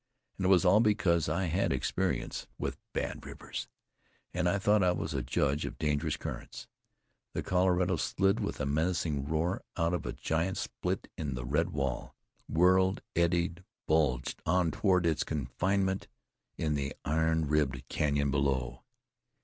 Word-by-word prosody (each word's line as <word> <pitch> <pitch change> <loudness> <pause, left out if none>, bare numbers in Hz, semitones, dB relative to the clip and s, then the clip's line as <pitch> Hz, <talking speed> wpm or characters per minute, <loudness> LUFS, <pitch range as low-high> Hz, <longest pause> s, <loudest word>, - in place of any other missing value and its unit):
And 95 - +1
it - - +3
was 95 -1 +5
all 95 +4 +6
because 100 -8 +3
I 85 +5 0
had 90 +2 0
had - - 0
experience - - -1
with - - -3
bad - - -3
rivers, - - -6 0.7
and 90 - +1
thought 105 +1 +4
I 90 -1 +4
was 85 - -3
a 65 - 0
judge 70 +4 0
of - - -5
dangerous 75 0 0
currents. - - -6 0.7
The - - -1
Colorado 90 0 +2
slid 95 +3 +1
with 105 - -3
a 70 - 0
menacing 80 -1 0
roar 80 +4 0 0.2
out 85 0 +1
of 90 - -2
a - - -1
giant 85 +4 -1
split - - -3
in 70 -4 -2
the 60 0 -4
red 75 +7 +1
wall, 70 -6 -3 0.3
and 80 - -5
whirled, 95 +2 +4
eddied, 85 +1 +1 0.2
bulged 70 -5 +1
on 90 0 +2
toward 90 0 +2
its 80 -3 +2
confinement 95 +7 -1 0.5
in 75 -2 0
the 70 -1 -2
iron 80 +1 +2
ribbed 70 -4 0
canyon 70 -2 +1
below. 65 -3 0
80 Hz, 155 wpm, -31 LUFS, 75-90 Hz, 0.7 s, all